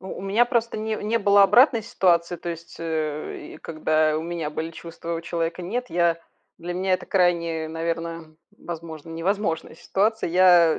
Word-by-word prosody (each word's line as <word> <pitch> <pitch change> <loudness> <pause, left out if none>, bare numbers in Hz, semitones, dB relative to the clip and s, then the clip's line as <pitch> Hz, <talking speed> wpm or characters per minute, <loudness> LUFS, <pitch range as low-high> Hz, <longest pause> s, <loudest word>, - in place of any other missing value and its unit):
У 190 - -9
у - - -8
меня 205 +5 +3
просто 235 -3 0
не 220 0 -2
не 225 +3 0
было 200 -1 +5
обратной 240 +3 +5
ситуации, 175 -3 +2
то 175 - -7
есть, 170 0 -7
э, 155 -2 -3
и - - -9
когда 155 -1 +1
у 160 - -2
меня 170 -2 -3
были 160 +2 -4
чувства, 170 +1 -7
а - - 0
у - - -4
человека- 170 +1 -3
нет. 245 +8 -3
Я 170 -1 +2 0.4
для 175 +1 -5
меня 190 +1 0
это - - -5
крайне, 170 -4 +1
наверно, 165 0 -4 0.2
возможно, 165 -2 -8
невозможная 165 0 -2
ситуация. 215 +4 0
Я 175 -3 +6
170 Hz, 180 wpm, -24 LUFS, 165-195 Hz, 0.4 s, Я